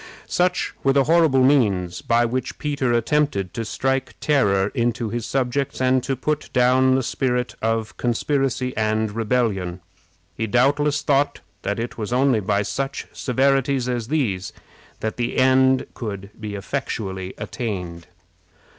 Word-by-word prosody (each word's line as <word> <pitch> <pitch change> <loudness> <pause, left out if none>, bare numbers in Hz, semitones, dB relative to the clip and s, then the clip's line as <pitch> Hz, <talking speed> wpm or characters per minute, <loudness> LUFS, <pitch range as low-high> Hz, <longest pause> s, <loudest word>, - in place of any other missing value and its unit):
Such 180 0 0
were 135 - +4
the 140 0 +4
horrible 155 -4 +4
means 95 -10 +2
by 120 +4 +2
which 125 +1 -3
Peter 140 -4 -1
attempted 120 -5 +1
to 115 - -3
strike 135 +3 -1
terror 100 -9 +2
into 120 -2 0
his 120 -1 -3
subjects, 135 +1 -1
and 130 0 +3
to 135 +2 -2
put 150 +4 -2
down 130 +1 +4
the 130 - +1
spirit 125 -1 -1
of 110 0 -1
conspiracy 130 +1 0
and 110 0 0
rebellion. 105 -5 -1 0.6
He 110 - -2
doubtless 145 +5 +2
thought 140 0 +1 0.2
that 100 - -2
it 115 +1 -5
was 105 +1 -4
only 130 -2 +3
by 100 0 0
such 135 +7 -3
severities 135 0 +1
as 120 -3 -2
these 115 -11 -1 0.5
that 110 - -3
the 120 -1 -2
end 130 0 +4
could 100 -3 -6
be 105 -2 -5
effectually 95 -4 -4
attained. 90 -8 -5
125 Hz, 140 wpm, -22 LUFS, 110-135 Hz, 0.6 s, were